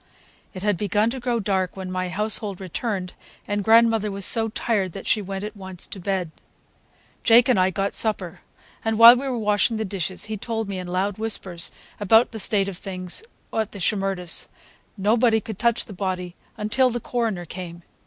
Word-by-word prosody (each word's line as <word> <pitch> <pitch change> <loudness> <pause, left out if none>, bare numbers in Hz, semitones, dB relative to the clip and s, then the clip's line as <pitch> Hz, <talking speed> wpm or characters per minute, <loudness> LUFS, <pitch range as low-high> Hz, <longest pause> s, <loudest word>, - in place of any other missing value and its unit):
It 185 - -7
had 205 -3 +1
begun 210 +3 +1
to 260 - -5
grow 240 -1 -1
dark 190 -3 -1
when 185 -1 -6
my 185 0 -2
household 205 0 0
returned, 190 0 -4 0.3
and 205 0 -1
grandmother 225 0 +4
was 195 -1 -1
so 225 -1 +6
tired 205 -5 -1
that 195 - -8
she 215 - +2
went 195 0 -5
at 210 - -6
once 190 -3 -2
to 195 - -7
bed. 185 -3 -2 0.9
Jake 235 +2 +6
and 250 -7 +3
I 185 0 +3
got 195 +1 -2
supper, 195 -6 -1 0.4
and 225 -1 0
while 230 +1 +11
we 270 +2 -3
were 255 -2 -2
washing 210 +1 +1
the 220 - -2
dishes 185 -2 -3
he 215 0 -4
told 225 +1 -3
me 195 -2 -4
in 180 - -6
loud 190 +3 -2
whispers 195 -6 -1 0.3
about 220 +4 +4
the 225 - -6
state 200 -1 +2
of 190 -2 -6
things 185 -2 -4 0.3
over 225 - +1
at 215 - -6
the 200 - -8
Shimerdas'. 195 -2 0 0.5
Nobody 220 +3 +3
could 215 -1 -8
touch 235 0 +1
the 205 - -10
body 180 -2 -3 0.2
until 235 +5 +2
the 240 0 -3
coroner 225 -6 -2
came. 170 0 -8
205 Hz, 195 wpm, -23 LUFS, 185-225 Hz, 0.9 s, while